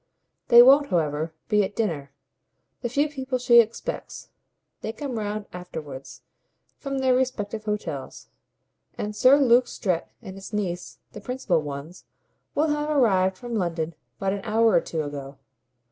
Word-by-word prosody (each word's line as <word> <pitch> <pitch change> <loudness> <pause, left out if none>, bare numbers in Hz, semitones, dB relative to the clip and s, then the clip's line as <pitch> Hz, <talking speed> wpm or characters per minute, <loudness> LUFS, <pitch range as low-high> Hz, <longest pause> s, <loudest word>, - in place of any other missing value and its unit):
"They 240 -1 +9
won't, 280 +3 +6
however, 155 -2 0 0.2
be 210 -1 +3
at 195 - -4
dinner, 160 -12 -2 0.7
the 240 - -2
few 285 +5 +1
people 265 -3 -3
she 240 -1 +6
expects 235 - -2 0.5
they 220 - -4
come 260 -4 -4
round 210 0 -3
afterwards 150 -7 -8 0.6
from 275 -1 -4
their 260 -1 +3
respective 225 -4 -1
hotels; 175 -10 -4 0.7
and 210 0 -4
Sir 260 +6 +6
Luke 250 -3 +4
Strett 180 -6 -2
and 195 -5 -10
his 195 +3 -10
niece, 180 -4 -3
the 210 - -10
principal 215 -8 0
ones, 145 +4 -8 0.5
will 305 +2 +2
have 295 0 -1
arrived 190 -10 +3
from 240 +4 -7
London 170 -5 -1 0.2
but 195 0 -1
an 200 - -4
hour 225 +1 +3
or 175 -3 +4
two 160 -2 -3
ago. 140 -1 -7
210 Hz, 150 wpm, -25 LUFS, 175-250 Hz, 0.7 s, They